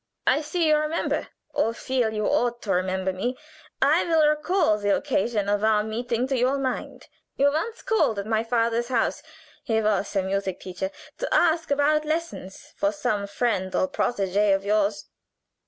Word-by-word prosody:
I - - +3
see 320 +2 0
you 305 0 +5
remember, 305 +2 -1 0.3
or 230 +1 0
feel 250 -3 0
you 215 -1 -2
ought 240 0 0
to 205 - -2
remember 185 +1 0
me. 245 +7 -3 0.5
I - - +4
will 320 -3 +3
recall 305 - +2
the 205 -1 +2
occasion 230 -6 -1
of 205 +1 0
our 215 -1 +3
meeting 235 +2 -2
to 270 - +1
your 255 +3 +2
mind. 260 -2 -4 0.3
You 285 +1 +3
once 435 +10 -3
called 440 - +1
at 200 - -3
my 220 0 0
father's 230 0 0
house 240 -3 0 0.4
he 225 -1 +1
was 210 -1 0
a 195 - +2
music 190 -1 -2
teacher 185 +1 -4 0.3
to - - -3
ask 330 0 +2
about 290 +2 +2
lessons 310 - -5
for 200 - +1
some 205 0 -2
friend 200 -3 -1
or 280 - +2
protégée 205 -6 +1
of 195 0 -4
yours. 205 0 +1
230 Hz, 170 wpm, -25 LUFS, 200-285 Hz, 0.5 s, you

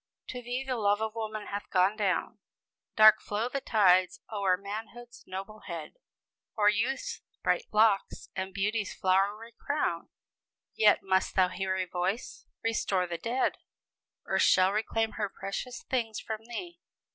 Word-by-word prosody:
"To 250 - -5
thee 245 +2 -3
the 260 -2 -2
love 205 -1 +2
of 220 0 -2
woman 215 -2 -4
hath 205 0 -5
gone 190 +2 +3
down; 200 -4 -1 0.6
Dark 215 0 +8
flow 215 +4 -2
the 275 +1 -3
tides 185 -6 +4
o'er 195 -4 +2
manhood's 225 +5 -8
noble 195 +3 -7
head, 170 - -7 0.6
Or 210 -1 +5
youth's 235 +6 -1 0.2
bright - - +1
locks, 210 -2 +2
and 190 0 -3
beauty's 205 +2 -1
flowery 200 +5 +1
crown; 285 - -1 0.6
Yet 210 -1 +4
must 190 0 +1
thou 185 -1 +4
hear 190 0 -2
a 185 - 0
voice 180 +5 -3 0.2
Restore 200 -5 +1
the 170 -1 -5
dead! 240 +7 0 0.7
Earth - - +1
shall 185 0 +5
reclaim 220 +1 0
her 205 -2 -1
precious 220 +7 -6
things 230 -4 -2
from 220 0 -6
thee! 345 +9 -7
210 Hz, 145 wpm, -29 LUFS, 190-225 Hz, 0.7 s, Dark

